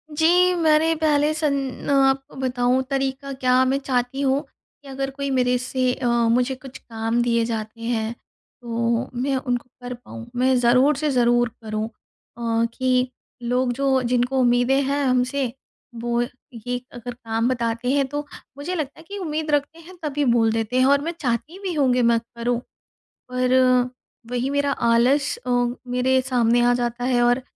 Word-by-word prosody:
जी, 355 Hz, +4 st, +4 dB
मैंने 320 Hz, -1 st, +3 dB
पहले 305 Hz, -1 st, +2 dB
सन 280 Hz, -5 st, -2 dB
आपको 270 Hz, -1 st, +2 dB
बताऊँ, 255 Hz, 0 st, +1 dB
तरीका 270 Hz, 0 st, -2 dB
क्या, 255 Hz, -1 st, +3 dB
मैं 265 Hz, +1 st, +1 dB
चाहती 260 Hz, 0 st, -1 dB
हूँ 275 Hz, 0 st, +2 dB, 0.4 s
कि 280 Hz, -, -16 dB
अगर 270 Hz, 0 st, -3 dB
कोई 280 Hz, +1 st, -4 dB
मेरे 250 Hz, -1 st, +2 dB
से 250 Hz, 0 st, 0 dB
अ, 255 Hz, -, -3 dB, 0.2 s
मुझे 250 Hz, +2 st, +1 dB
कुछ 260 Hz, 0 st, -11 dB
काम 225 Hz, +1 st, -2 dB
दिए 235 Hz, -1 st, +2 dB
जाते 225 Hz, 0 st, -5 dB
हैं, 230 Hz, -1 st, -1 dB, 0.5 s
तो 235 Hz, +1 st, -1 dB
मैं 270 Hz, +1 st, 0 dB
उनको 250 Hz, -1 st, -2 dB
कर 245 Hz, 0 st, -5 dB
पाऊँ, 235 Hz, -1 st, -10 dB
मैं 255 Hz, +1 st, +3 dB
ज़रूर 255 Hz, +5 st, +4 dB
से 305 Hz, +1 st, 0 dB
ज़रूर 240 Hz, -1 st, +3 dB
करूँ। 215 Hz, 0 st, -3 dB
अ, 230 Hz, 0 st, -4 dB
कि 255 Hz, -1 st, +1 dB, 0.3 s
लोग 245 Hz, +1 st, +1 dB
जो 265 Hz, 0 st, +1 dB
जिनको 250 Hz, +2 st, +1 dB
उम्मीदें 245 Hz, +2 st, +3 dB
हैं 280 Hz, +1 st, 0 dB
हमसे, 255 Hz, 0 st, 0 dB, 0.4 s
वो 235 Hz, +1 st, -1 dB, 0.5 s
ये 245 Hz, 0 st, -2 dB
अगर 245 Hz, 0 st, -7 dB
काम 230 Hz, -1 st, -2 dB
बताते 235 Hz, -1 st, -1 dB
हैं 280 Hz, 0 st, +2 dB
तो 290 Hz, +2 st, -4 dB, 0.3 s
मुझे 320 Hz, +6 st, -4 dB
लगता 295 Hz, -4 st, -4 dB
है -, -, -13 dB
कि 405 Hz, -, -5 dB
उम्मीद 315 Hz, -4 st, -3 dB
रखते 290 Hz, +3 st, 0 dB
हैं, 345 Hz, +3 st, -13 dB
तभी 295 Hz, -1 st, -1 dB
बोल 235 Hz, -2 st, +3 dB
देते 225 Hz, +2 st, -1 dB
हैं, 255 Hz, -, +5 dB
और 280 Hz, +1 st, +4 dB
मैं 330 Hz, +3 st, -2 dB
चाहती 255 Hz, -, -2 dB
भी 370 Hz, -2 st, -2 dB
हूँ 280 Hz, -5 st, +2 dB
कि 250 Hz, -, +2 dB
मैं 235 Hz, -1 st, +4 dB, 0.2 s
करूँ। 235 Hz, 0 st, -1 dB, 0.7 s
पर 250 Hz, 0 st, +1 dB, 0.8 s
वही 250 Hz, +2 st, -1 dB
मेरा 285 Hz, 0 st, +1 dB
आलस 240 Hz, +5 st, +2 dB
अ, -, -, -1 dB, 0.4 s
मेरे 250 Hz, +1 st, +2 dB
सामने 240 Hz, -2 st, +2 dB
आ 245 Hz, 0 st, +4 dB
जाता 240 Hz, 0 st, -2 dB
है, 250 Hz, -1 st, +2 dB
और 245 Hz, +2 st, +3 dB
255 Hz, 170 wpm, -23 LUFS, 240-275 Hz, 0.8 s, हैं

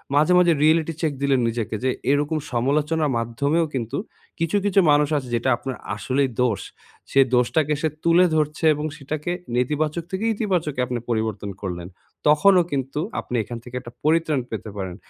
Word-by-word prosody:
মাঝে, 150 Hz, +5 st, +4 dB
মাঝে 175 Hz, -2 st, +5 dB
reality 160 Hz, +1 st, +3 dB
check 155 Hz, -3 st, 0 dB
দিলেন 140 Hz, -2 st, +3 dB
নিজেকে 115 Hz, -1 st, -3 dB
যে, 130 Hz, -, +2 dB, 0.2 s
এরকম 145 Hz, +2 st, +1 dB
সমালোচনার 145 Hz, +5 st, +1 dB
মাধ্যমেও 140 Hz, +8 st, 0 dB
কিন্তু 115 Hz, -3 st, -3 dB, 0.4 s
কিছু, 165 Hz, +4 st, +1 dB
কিছু 200 Hz, -1 st, +3 dB
মানুষ 145 Hz, 0 st, +3 dB
আছে 135 Hz, -3 st, -4 dB
যেটা 120 Hz, +3 st, 0 dB
আপনার 130 Hz, +1 st, -5 dB, 0.2 s
আসলেই 130 Hz, +5 st, 0 dB
দোষ, 115 Hz, -5 st, +1 dB, 0.5 s
সে 135 Hz, -, +3 dB, 0.2 s
দোষটাকে 145 Hz, +5 st, +2 dB
সে 160 Hz, -, +1 dB
তুলে 170 Hz, +2 st, +5 dB
ধরছে 155 Hz, +1 st, 0 dB
এবং 150 Hz, +1 st, -4 dB
সেটাকে 150 Hz, +3 st, -4 dB, 0.2 s
নেতিবাচক 150 Hz, +6 st, 0 dB
থেকে 190 Hz, +4 st, -2 dB
ইতিবাচকে 180 Hz, -, -1 dB
আপনি 125 Hz, -1 st, -2 dB
পরিবর্তন 110 Hz, -3 st, -2 dB
করলেন, 90 Hz, -3 st, -5 dB, 0.4 s
তখনও 175 Hz, +5 st, +6 dB
কিন্তু 135 Hz, +1 st, -2 dB, 0.2 s
আপনি 125 Hz, -, -5 dB
এখান 120 Hz, +3 st, -7 dB
থেকে 125 Hz, +1 st, -10 dB
একটা 120 Hz, -1 st, -11 dB
পরিত্রাণ 155 Hz, -2 st, +2 dB
পেতে 110 Hz, 0 st, -5 dB
পারেন। 95 Hz, -2 st, -4 dB
145 Hz, 165 wpm, -23 LUFS, 125-160 Hz, 0.5 s, তখনও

